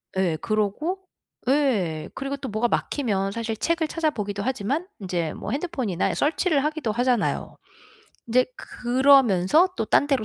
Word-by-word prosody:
예 180 -4 +1
그러고 215 - -1 0.5
예. 210 - +1
그리고 275 +1 -3
또 270 - -6
뭐가 215 +3 +1
막히면 200 -7 -1
사실 225 0 -3
책을 330 +8 0
찾아보기도 210 -12 -2
하지만 260 - -1
인제 175 -5 -2
뭐 205 - -6
핸드폰이나 265 - -1
search를 300 -1 +1
하기도 300 -6 -1
하잖아요. 245 0 0 0.7
인제 250 +2 +3
그러면서 260 - +4
또 - - 0
딴 280 - +3
데로 275 -6 +1
245 Hz, 340 characters per minute, -24 LUFS, 205-290 Hz, 0.7 s, 그러면서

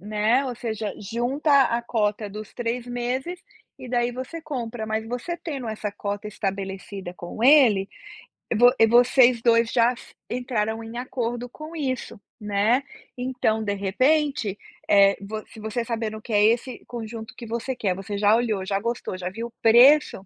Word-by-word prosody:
Né, 215 +6 +1
ou 255 -2 -3
seja, 220 -3 -4
junta 245 +8 -1
a 235 - 0
cota 210 -3 -1
dos 210 +1 -9
3 240 0 -3
meses 250 +8 -3 0.4
e 255 - -9
daí 240 0 +1
você 260 +7 -6
compra, 240 -7 -4
mas 220 0 -2
você 245 +9 -4
tendo 275 -9 -5
essa 215 -1 -4
cota 205 0 -4
estabelecida 195 -2 -5
com 180 +5 -7
ele, 240 -8 +6 0.7
vo 245 +3 +7 0.2
vocês 245 0 +5
2 230 -1 +3
já 240 0 +3
se - - -15 0.2
entraram 225 -3 -2
em 225 +1 -8
acordo 245 -1 -3
com 310 +6 -10
isso, 260 -8 -3 0.2
né, 210 +5 +2 0.4
então 245 -3 -1
de 205 -1 -1
repente, 255 +2 +1 0.3
eh, 200 -1 +6
vo 215 +2 -6
se 225 - -14
você 220 +2 -3
sabendo 225 -2 -3
que 225 - -7
é 205 0 +4
esse 235 +2 0
conjunto 225 -1 -7
que 235 - -8
você 235 +3 -3
quer, 195 -6 -1
você 195 +2 -5
já 205 +1 +4
olhou, 220 -5 0
já 195 0 0
gostou, 235 -3 -3
já 180 0 -4
viu 230 +4 -7
preço, 240 -1 +6
230 Hz, 165 wpm, -24 LUFS, 210-245 Hz, 0.7 s, vo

